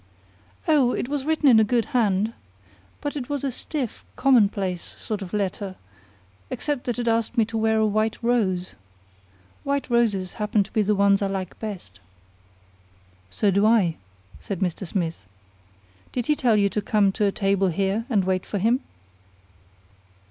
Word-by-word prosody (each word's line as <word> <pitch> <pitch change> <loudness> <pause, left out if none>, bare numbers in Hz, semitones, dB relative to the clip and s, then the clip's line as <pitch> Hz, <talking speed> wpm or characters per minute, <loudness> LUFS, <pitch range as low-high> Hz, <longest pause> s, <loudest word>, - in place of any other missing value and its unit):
"Oh, 280 -6 +4
it - - -2
was 285 -2 -2
written 315 -1 +2
in 235 -4 +7
a - - +6
good 230 +1 +1
hand. 215 -2 +2 0.7
But 290 - -3
it 270 -3 -5
was 285 -2 -2
a 275 - 0
stiff, 260 -1 -4
commonplace 200 -8 +2
sort 210 -2 -4
of 185 -2 -7
letter, 200 -1 -2 0.7
except 290 -4 -3
that 245 -1 -2
it 240 -1 -2
asked 230 0 0
me 225 - +4
to 225 - -8
wear 220 0 +2
a 220 - +3
white 215 +1 0
rose. 195 -7 0 0.9
White 280 -2 -2
roses 205 -6 +1
happen 210 0 +2
to 195 - -16
be 215 - +2
the 210 0 +2
ones 200 0 +4
I 200 - +1
like 190 -2 -5
best." 180 - -7 1.3
"So 200 - +1
do 200 +2 +2
I," 200 -8 +3 0.4
said 195 -4 -5
Mr. 185 0 -2
Smith. 165 - -3 0.8
"Did 245 -2 -2
he 300 - +2
tell 245 -7 +2
you 200 -1 +3
to 210 - -2
come 205 -1 +2
to 210 - 0
a 200 - +2
table 195 -1 +1
here 195 +5 0
and 205 -6 +2
wait 185 0 0
for 205 - -4
him?" 230 +6 +2
210 Hz, 170 wpm, -24 LUFS, 195-240 Hz, 1.3 s, in